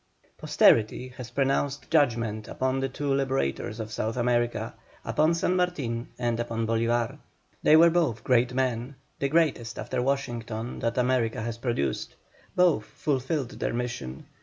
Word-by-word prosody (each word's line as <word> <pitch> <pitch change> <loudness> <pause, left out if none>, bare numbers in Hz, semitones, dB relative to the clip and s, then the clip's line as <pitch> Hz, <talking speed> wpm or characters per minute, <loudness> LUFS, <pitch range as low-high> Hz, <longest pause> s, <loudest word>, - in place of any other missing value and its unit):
Posterity 115 +3 +3
has 125 -1 -9
pronounced 135 +2 -1
judgment 115 -8 +1
upon 130 0 -1
the 135 0 -1
two 140 +2 -2
liberators 130 - -1
of 110 -1 -5
South 110 +2 -2
America, 120 -1 0 0.3
upon 155 +2 +2
SAN 180 +2 +1
MARTIN 140 -11 -1
and 120 -1 -1
upon 115 -1 -2
BOLÍVAR. 115 +4 0 0.4
They 155 - +6
were 165 +1 +7
both 145 -10 +1
great 125 0 +3
men, 125 0 -1 0.2
the 140 - 0
greatest 135 -8 +1
after - - -2
Washington 120 -3 -2
that 115 +1 -1
America 125 -3 +1
has 115 0 -4
produced. 115 - -2 0.4
Both 170 -12 +3
fulfilled 135 -1 -2
their - - -1
mission. 120 - -4
125 Hz, 140 wpm, -27 LUFS, 115-140 Hz, 0.4 s, were